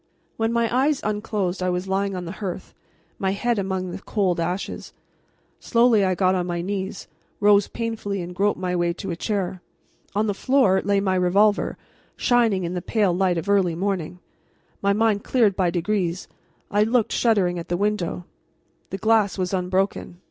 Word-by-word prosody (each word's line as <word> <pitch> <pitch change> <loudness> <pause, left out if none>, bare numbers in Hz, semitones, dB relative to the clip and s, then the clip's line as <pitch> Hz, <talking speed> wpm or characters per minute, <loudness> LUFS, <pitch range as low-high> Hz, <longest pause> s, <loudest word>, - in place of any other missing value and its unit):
When 225 0 0
my 235 0 +2
eyes 280 +2 +2
unclosed 210 -3 -2
I 185 - +1
was 180 +1 -2
lying 195 0 -1
on 180 -1 -5
the 170 - -5
hearth, 185 -2 -5 0.5
my 190 0 0
head 235 +2 0
among 190 -2 -2
the - - -6
cold 190 -5 0
ashes. 175 +3 -4 0.7
Slowly 235 -3 +3
I 185 -1 +1
got 185 0 +2
on 180 -1 -1
my 175 -1 -2
knees, 190 0 -4 0.3
rose 205 -1 +5
painfully, 225 -4 -3
and 175 +1 -7
groped 200 +2 +1
my 180 -1 -1
way 175 -1 +1
to 185 +2 -6
a - - -2
chair. 190 -1 -2 0.5
On 210 +1 +2
the 205 - 0
floor 215 -4 +3
lay 200 0 +2
my 190 -1 +1
revolver, 195 +3 +2 0.4
shining 230 -6 +2
in 170 +1 -3
the 180 - -3
pale 205 -1 +1
light 180 -1 +1
of 165 - -4
early 195 -4 +2
morning. 180 -2 -2 0.6
My 200 - +2
mind 210 0 +2
clearing 235 -6 +3
by 185 -2 0
degrees, 180 0 -1 0.4
I 205 0 +3
looked, 225 +1 +2
shuddering, 190 -7 +2
at 165 - -8
the 175 - 0
window. 195 -3 -1 0.6
The 195 - -4
glass 220 -1 +2
was 185 0 -2
unbroken. 185 -1 -1
195 Hz, 175 wpm, -23 LUFS, 180-210 Hz, 0.7 s, rose